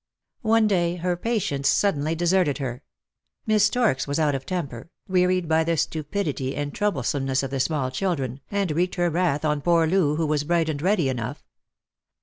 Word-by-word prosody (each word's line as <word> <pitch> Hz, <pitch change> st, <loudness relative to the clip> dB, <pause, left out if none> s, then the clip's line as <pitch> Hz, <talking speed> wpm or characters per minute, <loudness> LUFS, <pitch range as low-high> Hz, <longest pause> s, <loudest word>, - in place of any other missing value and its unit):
One 225 Hz, 0 st, +3 dB
day 175 Hz, -4 st, +1 dB
her 180 Hz, 0 st, -1 dB
patience 175 Hz, -, -1 dB
suddenly 160 Hz, -4 st, +1 dB
deserted 175 Hz, -3 st, +2 dB
her. 130 Hz, -3 st, -4 dB, 0.6 s
Miss 215 Hz, -2 st, +4 dB
Storks 215 Hz, -, +1 dB
was 140 Hz, -, -1 dB
out 150 Hz, -2 st, +2 dB
of 135 Hz, -1 st, -4 dB
temper, 165 Hz, -7 st, -4 dB, 0.2 s
wearied 180 Hz, -1 st, +2 dB
by 160 Hz, 0 st, +3 dB
the 165 Hz, 0 st, 0 dB
stupidity 150 Hz, -4 st, -2 dB
and 145 Hz, 0 st, -3 dB
troublesome 145 Hz, -, -1 dB
ness 135 Hz, 0 st, 0 dB
of 135 Hz, -, -4 dB
the 135 Hz, -, -2 dB
small 135 Hz, -2 st, 0 dB
children, 135 Hz, -5 st, -2 dB
and 200 Hz, -4 st, -1 dB
wreaked 175 Hz, +4 st, 0 dB
her 175 Hz, -2 st, +1 dB
wrath 160 Hz, -3 st, 0 dB
on 150 Hz, -1 st, 0 dB
poor 170 Hz, +1 st, +3 dB
Loo, 160 Hz, -3 st, +2 dB
who 160 Hz, +1 st, 0 dB
was 150 Hz, -1 st, 0 dB
bright 165 Hz, +1 st, +1 dB
and 145 Hz, -2 st, -3 dB
ready 180 Hz, -4 st, +2 dB
enough. 125 Hz, +1 st, -4 dB
160 Hz, 180 wpm, -24 LUFS, 140-180 Hz, 0.6 s, Miss